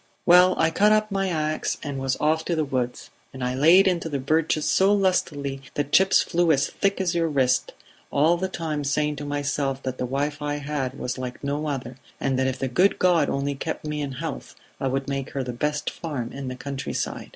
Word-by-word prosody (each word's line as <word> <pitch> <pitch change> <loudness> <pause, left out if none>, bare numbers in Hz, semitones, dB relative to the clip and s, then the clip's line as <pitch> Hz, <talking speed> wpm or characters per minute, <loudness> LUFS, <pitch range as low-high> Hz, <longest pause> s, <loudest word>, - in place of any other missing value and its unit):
"Well, 180 +1 +6
I 160 - +2
caught 210 +5 +4
up 215 0 +2
my 195 -1 0
ax 155 -2 -1
and 140 -2 -4
was 135 -1 -1
off 160 +1 +1
to 170 - 0
the 155 -1 0
woods; 125 -3 -3 0.2
and 130 -1 -7
I 125 0 -1
laid 165 +9 +6
into 170 -3 0
the 145 - -1
birches 155 +2 +1
so 190 +1 +4
lustily 150 -9 0
that 145 0 -2
chips 190 0 +5
flew 170 -1 +2
as 145 0 +1
thick 200 -1 0
as 185 -3 0
your 170 -1 +1
wrist, 130 -4 +1 0.4
all 155 +4 +3
the 185 +2 -2
time 155 -5 -3
saying 150 +1 0
to 145 - -5
myself 145 -1 -2
that 130 -1 -4
the 125 - -1
wife 145 +3 -2
I 145 0 -1
had 140 -2 -3
was 125 0 -4
like 125 +1 -6
no 145 +2 -2
other, 130 -3 -4 0.2
and 135 -1 0
that 130 - +2
if 130 0 -2
the 135 - -2
good 180 +11 +3
God 175 -5 +3
only 140 +1 -1
kept 155 +3 -5
me 150 0 -3
in 140 -2 -4
health 130 - -6 0.2
I 135 - -1
would 135 +1 -2
make 135 -1 -4
her 135 - -2
the 125 -1 -5
best 150 +4 -2
farm 140 -8 -5
in 135 -1 -6
the 130 - -4
countryside." 135 +1 -4
145 Hz, 220 wpm, -24 LUFS, 135-165 Hz, 0.4 s, Well